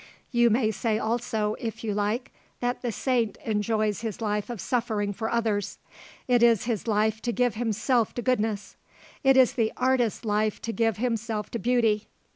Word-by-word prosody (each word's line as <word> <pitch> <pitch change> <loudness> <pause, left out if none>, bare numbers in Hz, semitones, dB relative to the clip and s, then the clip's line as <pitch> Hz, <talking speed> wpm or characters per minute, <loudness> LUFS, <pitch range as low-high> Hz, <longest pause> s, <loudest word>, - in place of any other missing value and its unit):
"You 240 -2 +4
may 220 0 +2
say 220 +1 0
also, 220 -2 -1
if 225 -1 -5
you 215 -2 -1
like, 210 +5 -1 0.3
that 245 0 -1
the 240 - -2
saint 235 -3 0
enjoys 215 -1 0
his 220 -4 -4
life 210 -1 -1
of 240 -3 -5
suffering 215 -3 -1
for 220 +2 -3
others. 220 -4 -1 0.5
It 245 -2 +3
is 235 -3 +5
his 235 -2 -2
life 220 0 +1
to 240 - -1
give 245 -1 +1
himself 230 +1 0
to 240 - -3
goodness; 220 -5 -1 0.5
it 270 -1 +5
is 260 -2 +5
the 225 -3 +1
artist's 250 -3 +1
life 215 0 0
to 230 - -2
give 225 -3 +1
himself 225 -3 -2
to 235 - -3
beauty. 225 -3 +2
225 Hz, 175 wpm, -26 LUFS, 210-240 Hz, 0.5 s, is